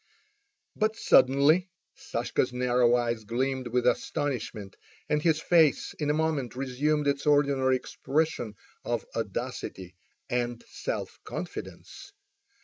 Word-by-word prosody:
But 215 +1 +1
suddenly 145 - +4 0.3
Sashka's 125 +2 -1
narrow 125 -1 +3
eyes 120 -2 -1
gleamed 130 +3 -1
with 125 +1 0
astonishment, 115 -8 -1 0.3
and 150 0 +1
his 160 -1 +2
face 160 -3 +3
in 150 -1 -1
a - - +3
moment 155 -6 -1
resumed 140 +3 0
its 140 +1 0
ordinary 140 -3 +3
expression 130 -3 -2 0.3
of - - -2
audacity 90 -2 -4 0.3
and 120 -1 -2
self - - -5
confidence. 400 - -8
135 Hz, 110 wpm, -28 LUFS, 120-150 Hz, 0.3 s, suddenly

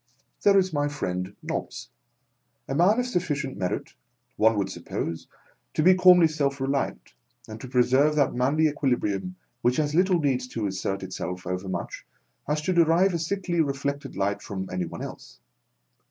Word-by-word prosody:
There 200 -1 +5
is 185 -2 +2
my 145 -1 +1
friend 90 -9 -4
Nobbs, - - -5 0.8
A - - -3
man 185 - +4
of 250 - 0
suf 245 -8 0
ficient 145 -5 -3
merit, 90 -2 -3 0.4
one 110 0 +3
would 100 - -1
suppose, 85 0 -5 0.5
to 155 - +2
be 185 +3 +7
calmly 180 -2 +7
self 140 -3 -1
reliant, 135 +1 -2 0.3
and 110 0 -9
to - - -7
preserve 130 +4 +3
that 140 -3 +2
manly 140 +6 +2
equi 145 -3 0
librium 95 -5 -3 0.3
which 125 +1 +2
as 150 -1 0
little 180 +2 +3
needs 130 -4 0
to 115 -4 -4
assert 95 0 -3
itself 90 +2 -5
overmuch, 90 +1 -4 0.4
as 150 +1 -1
to 185 - 0
derive 170 +3 +4
a 170 - -1
sickly 175 0 -1
reflected 140 -1 -3
light 100 +1 -1
from 95 -1 -5
any 90 -1 -2
one 80 - -7
else. - - -10
140 Hz, 170 wpm, -26 LUFS, 100-165 Hz, 0.8 s, be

